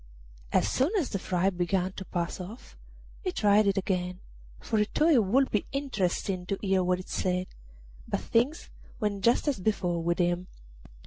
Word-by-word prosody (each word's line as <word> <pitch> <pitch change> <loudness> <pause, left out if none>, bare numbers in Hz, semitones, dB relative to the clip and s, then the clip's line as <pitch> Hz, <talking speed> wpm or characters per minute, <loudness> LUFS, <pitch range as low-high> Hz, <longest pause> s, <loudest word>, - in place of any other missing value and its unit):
As - - +3
soon 265 +4 +2
as 325 -9 0
the 195 - -1
fright 185 +1 0
began 180 +1 0
to 190 0 -8
pass 170 -1 -3
off 200 +7 -9 0.5
he 370 - -1
tried 210 - +4
it 200 0 +2
again, 180 -2 -1 0.4
for 220 - -1
he 210 - +3
thought 315 +9 +3
it 240 -6 +5
would 260 +8 +2
be 210 - 0
interesting 195 -9 -1
to 195 - -1
hear 190 -2 +1
what 180 0 +1
it 185 - -9
said; 180 0 -1 0.6
but - - -1
things 250 +8 0 0.3
went 205 -3 -1
just 235 +6 +3
as 280 -8 +1
before 180 -4 0
with 170 +1 0
him. 175 0 0
195 Hz, 180 wpm, -28 LUFS, 180-220 Hz, 0.6 s, it